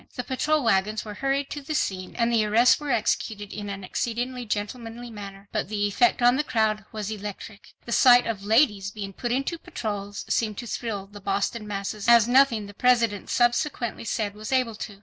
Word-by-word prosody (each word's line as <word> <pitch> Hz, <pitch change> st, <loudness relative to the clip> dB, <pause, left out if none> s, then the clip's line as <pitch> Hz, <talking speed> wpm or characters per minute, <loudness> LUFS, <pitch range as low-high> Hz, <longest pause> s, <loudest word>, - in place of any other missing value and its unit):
The 250 Hz, -, -3 dB
patrol 295 Hz, +4 st, 0 dB
wagons 215 Hz, 0 st, +1 dB
were 210 Hz, -, -6 dB
hurried 275 Hz, +4 st, -1 dB
to 290 Hz, -, -4 dB
the 305 Hz, +2 st, -4 dB
scene 185 Hz, -8 st, -2 dB
and 235 Hz, 0 st, +1 dB
the 225 Hz, -2 st, +4 dB
arrests 225 Hz, +4 st, +4 dB
were 295 Hz, -1 st, -6 dB
executed 215 Hz, -3 st, -1 dB
in 205 Hz, -1 st, -6 dB
an 195 Hz, -1 st, -6 dB
exceedingly 245 Hz, +5 st, -3 dB
gentlemanly 225 Hz, +3 st, -4 dB
manner. 200 Hz, -2 st, -9 dB
But 215 Hz, -2 st, -2 dB
the 205 Hz, -1 st, 0 dB
effect 255 Hz, -, +2 dB
on 245 Hz, +2 st, +5 dB
the 300 Hz, -, +1 dB
crowd 215 Hz, -6 st, 0 dB
was 215 Hz, -2 st, -4 dB
electric. 210 Hz, 0 st, -8 dB
The 235 Hz, -, -7 dB
sight 245 Hz, 0 st, +6 dB
of 210 Hz, -4 st, -3 dB
'ladies' 210 Hz, -3 st, +3 dB
being 200 Hz, -2 st, -7 dB
put 240 Hz, +4 st, -3 dB
into 275 Hz, +7 st, -1 dB
patrols, 205 Hz, -6 st, -5 dB
seemed 215 Hz, -3 st, 0 dB
to 240 Hz, -, -5 dB
thrill 215 Hz, -4 st, -4 dB
the 205 Hz, +1 st, -13 dB
Boston 200 Hz, +3 st, -2 dB
masses 200 Hz, 0 st, -4 dB
as 235 Hz, -2 st, +7 dB
nothing 245 Hz, -4 st, +4 dB
the 205 Hz, -, -11 dB
President 230 Hz, -3 st, +2 dB
subsequently 240 Hz, -1 st, 0 dB
said 215 Hz, -2 st, -2 dB
was 215 Hz, +3 st, -7 dB
able 255 Hz, -3 st, +2 dB
to. 205 Hz, -1 st, -8 dB
220 Hz, 195 wpm, -25 LUFS, 205-245 Hz, -, as